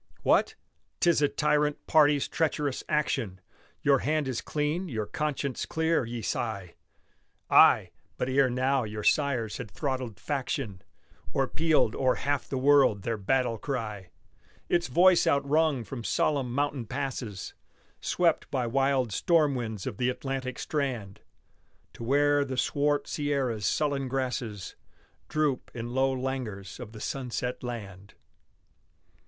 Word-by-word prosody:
What! - - +3 0.4
'tis 170 -4 +3
a 145 - +5
tyrant 150 -1 +1
party's 150 -2 +4
treacherous 150 -3 -1
action 130 -10 0 0.4
Your 140 -2 +4
hand 155 -1 0
is 130 -3 -2
clean, 155 +5 -2
your 110 -5 -2
conscience 140 +3 -3
clear, 160 -4 +1
ye 115 0 -5
sigh; 100 -5 -3 0.8
Ay! - - +6 0.3
but 125 - -1
ere 130 0 +3
now 130 +1 +1
your 105 -1 -5
sires 130 -7 +1
had 125 -5 -7
throttled 130 -3 -3
faction, 130 -8 -3 0.5
Or, 135 -1 +1
pealed 155 -8 +2
o'er 130 -1 +2
half 145 -1 -2
the 135 - -2
world 135 -7 +4
their 115 +1 -1
battle 115 +2 0
cry; 105 -9 -4 0.6
Its 175 0 +2
voice 175 +7 +5
outrung 140 -1 +2
from 120 +1 -7
solemn 135 0 0
mountain 140 -2 -1
passes 115 -8 -4 0.5
Swept 170 -3 +1
by 130 -3 -1
wild 135 -2 +1
storm 155 - +3
winds 110 -6 -4
of 120 -6 -4
the 125 0 +1
Atlantic 130 0 -4
strand, 125 -10 -3 0.7
To - - -9
where 145 +3 +3
the 130 -2 -5
swart 145 +2 +1
Sierras' 135 -8 -1
sullen 140 -3 0
grasses 125 -7 -3 0.5
Droop 150 -4 0
in 120 0 -5
low 135 +1 +2
languors 125 -7 -4
of 120 -4 -8
the 110 - -9
sunset 125 -2 -3
land! 100 -5 -7
130 Hz, 135 wpm, -28 LUFS, 115-145 Hz, 0.8 s, Ay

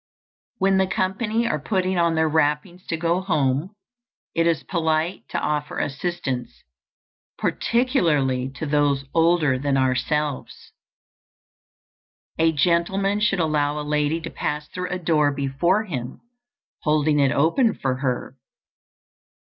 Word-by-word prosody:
When 195 -1 +3
the 190 - +2
company 210 +5 0
are 155 - 0
putting 185 +3 0
on 170 -1 +2
their 160 0 +2
wrappings 160 +4 0
to 165 - -2
go 170 +3 0
home, 155 0 0 0.6
it 165 0 +2
is 165 -2 +1
polite 160 0 -1
to - - -3
offer 150 -1 -2
assistance, 140 -4 -3 0.7
particularly 150 - +1
to - - -4
those 145 -2 +1
older 165 -5 +3
than 140 0 0
ourselves. 135 +2 -1 1.7
A 165 0 +4
gentleman 180 +6 +1
should 210 -3 +1
allow 150 -2 +1
a 150 - -5
lady 150 +2 +1
to 165 - -6
pass 150 0 -3
through 180 0 -5
a 180 - -2
door 155 -4 +2
before 140 +9 +1
him, 130 - -6 0.6
holding 150 -1 +2
it 140 -1 +3
open 190 - +2
for 130 -2 -2
her. 130 -1 -3
160 Hz, 125 wpm, -23 LUFS, 145-180 Hz, 1.7 s, A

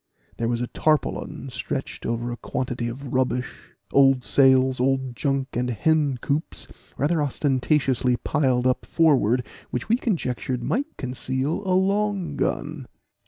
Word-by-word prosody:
There 115 - -1
was 120 0 -1
a - - 0
tarpaulin 155 +3 -1
stretched - - -4
over 120 +1 -2
a 120 - -5
quantity 125 -1 -3
of 125 +2 -6
rubbish, 125 -1 -2 0.2
old 135 -2 +5
sails, 130 -1 +4
old 130 -1 0
junk, 135 -2 -1
and 125 +1 -1
hencoops, 145 +3 0 0.3
rather 150 +4 +1
ostentatiously 135 -2 +1
piled 130 -3 +1
up 130 0 +2
forward, 130 -7 +3 0.2
which 125 - -4
we 230 - +4
conjectured 130 - -2
might 285 +6 -2
conceal 130 +5 -2
a 185 0 +3
long 195 -4 0
gun. 145 -2 -2
130 Hz, 130 wpm, -24 LUFS, 125-150 Hz, 0.3 s, old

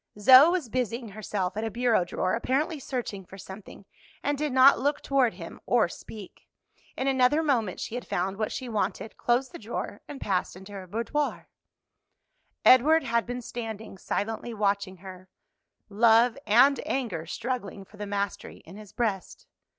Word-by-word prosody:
Zoe 260 +8 +9
was 345 -6 -1
busying 235 0 -3
herself 200 -2 -3
at 215 - -3
a 225 - -1
bureau 235 -3 +2
drawer, 185 +1 -2
apparently 285 +7 -1
searching 245 -7 -5
for 190 +1 -13
something, 195 +1 -11 0.4
and 290 - 0
did 295 0 -2
not 260 +2 +6
look 285 +2 0
toward 260 -7 +2
him 170 -2 -9
or 235 -6 +3
speak. 200 +3 -11 0.5
In 265 - -1
another 270 +4 +3
moment 235 - 0
she - - -5
had 245 0 -5
found 190 +2 -2
what 215 0 -2
she 260 - -5
wanted, 220 0 -3
closed 245 +2 0
the - - -9
drawer, 215 -2 -5
and 290 -2 -8
passed 185 -7 -1
into 190 +2 -12
her 195 -2 -8
boudoir. 235 +9 -3 1.2
Edward 305 +6 +6
had 235 0 0
been 245 0 -5
standing 220 -3 -7
silently 225 +4 -4
watching 200 -2 -1
her, 185 0 -12 0.6
love 225 +3 +4
and 255 +6 +5
anger 210 -12 -2
struggling 215 -2 -4
for 210 - -18
the 205 0 -5
mastery 200 0 -4
in 185 +5 -12
his 210 -2 -12
breast. 210 -6 -3
225 Hz, 165 wpm, -27 LUFS, 200-255 Hz, 1.2 s, Zoe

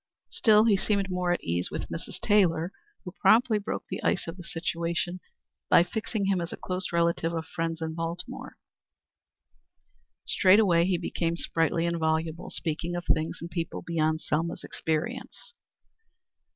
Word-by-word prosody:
Still 215 -1 +5
he 220 -3 +5
seemed 200 -1 0
more 180 -1 0
at 175 - 0
his - - -13
ease 85 +2 0
with - - -5
Mrs. - - -6
Taylor, 180 -4 +3 0.3
who 180 - -7
promptly 225 -1 +5
broke 205 - -4
the - - -5
ice - - +1
of 165 - -5
the 180 - -10
situation 170 +1 -2 0.5
by 170 - +7
fixing 215 +2 -3
him 195 -2 +1
as 170 - -4
a - - -6
close 185 0 -3
relative 170 0 +1
of 165 -1 -3
friends 165 -1 -3
in 160 0 -3
Baltimore. 165 +2 -5 1.7
Straightway 185 -3 +5
he 185 -1 +1
became 170 -1 -2
sprightly 165 0 0
and 170 0 -1
voluble, 160 +1 -1
speaking 165 +2 -3
of 175 -1 -4
things 155 +1 0
and 170 +1 -7
people 165 -2 -4
beyond 160 -1 0
Selma's 165 +3 -2
experience. 235 - -4
170 Hz, 155 wpm, -28 LUFS, 165-185 Hz, 1.7 s, by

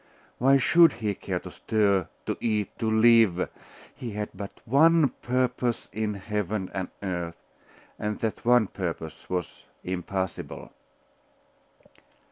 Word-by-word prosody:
Why 135 +2 +5
should 170 +6 +6
he 110 -3 -2
care - - -3
to - - -9
stir, 100 -5 +1 0.2
to - - -1
eat, 105 -3 -1
to 110 - 0
live? 110 -5 +5 0.5
He 120 -4 -7
had 105 0 -3
but 100 +1 -6 0.2
one 155 +4 +5
purpose 125 -1 0
in 105 -1 -1
heaven 100 -1 -3
and 95 -2 -3
earth: 85 -3 -3 0.6
and 105 0 -2
that 110 -2 -2
one 120 -1 +5
purpose 85 -5 -6
was 90 -3 -3 0.2
impossible. 95 0 -4
105 Hz, 120 wpm, -27 LUFS, 95-120 Hz, 0.6 s, should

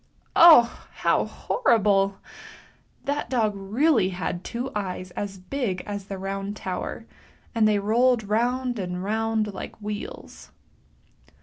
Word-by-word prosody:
Oh! 310 -9 +7
how - - +2
horrible! 200 - +1 0.9
that 290 +1 -2
dog 225 -5 +1
really 215 - +2
had 180 -1 -4
two 250 +3 -4
eyes 185 -3 -4
as 195 0 -5
big 190 -1 -3
as 205 -1 -5
the 195 -1 -6
Round 195 +1 -4
Tower, 185 -1 -5 0.5
and 225 -3 +3
they 210 -1 +3
rolled 230 +3 +2
round 240 +3 0
and 180 -1 -4
round 220 0 -1
like - - -7
w 210 -1 -5
heels. - - -10
210 Hz, 125 wpm, -25 LUFS, 195-240 Hz, 0.9 s, Oh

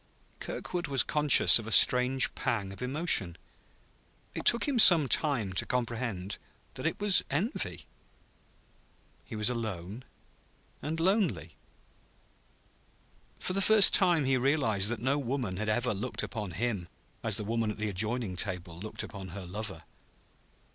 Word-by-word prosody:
Kirkwood 175 -3 -5
was 135 -3 +1
conscious 150 -5 +4
of 110 - -9
a - - -6
strange 125 +3 +5
pang 100 -4 -3
of 100 - -11
emotion. 125 - +1 1.0
It - - -6
took 235 - +3
him 270 -4 0
some 165 -9 +8
time 120 -9 +1
to 90 - 0
comprehend 115 -6 -4 0.3
that - - -4
it - - -4
was 205 -2 +4
envy. 195 - -4 1.4
He 115 - -10
was 105 -1 -1
alone 110 -1 -6 0.8
and 160 +2 -5
lonely. 175 - -1 1.8
For 185 - -3
the 195 - -1
first 215 +1 +6
time 175 -6 +3
he 130 0 +1
realized 120 -7 +1
that 120 -2 -4
no 135 +3 0
woman 125 -8 -4
had 110 +1 -3
ever 120 +3 -1
looked 110 +6 -4
upon 105 -6 -6
him 100 -3 -3 0.4
as - - 0
the - - -4
woman 115 +1 -2
at 105 - -6
the 105 0 -3
adjoining 110 +1 -3
table 90 -3 -4
looked 110 +3 -6
upon 100 -2 -9
her 95 +2 -9
lover. 105 +2 -7
115 Hz, 145 wpm, -29 LUFS, 100-145 Hz, 1.8 s, some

